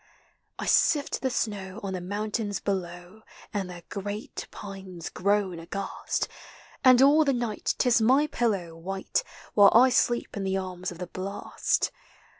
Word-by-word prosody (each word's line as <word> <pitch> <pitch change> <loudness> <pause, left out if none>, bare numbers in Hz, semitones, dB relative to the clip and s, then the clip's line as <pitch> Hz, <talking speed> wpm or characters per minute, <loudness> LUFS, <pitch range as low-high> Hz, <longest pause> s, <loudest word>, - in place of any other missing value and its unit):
1 - - -4
sift 290 -3 +3
the 260 - +1
snow 205 -4 -3
on 195 -1 -3
the 185 - -3
mountains 205 +2 -2
below, 180 +1 -4 0.3
And 195 -3 -2
their 175 -1 -9
great 205 +2 -5
pines 190 -4 -8
groan 200 -2 0
aghast; 195 +4 -3 0.6
And 255 -1 +7
all 295 +3 +6
the 280 -2 +2
night 240 -4 -1
't - - +2
is 235 -2 +4
my 260 +6 +5
pillow 200 - -1
white, 190 - -2 0.3
While 200 -1 +8
I 255 +3 +8
sleep 240 -1 +1
in 200 - -3
the 190 0 0
arms 185 -1 -4
of 175 - -9
the 180 - -4
blast. 195 +3 -2
200 Hz, 155 wpm, -27 LUFS, 185-230 Hz, 0.6 s, While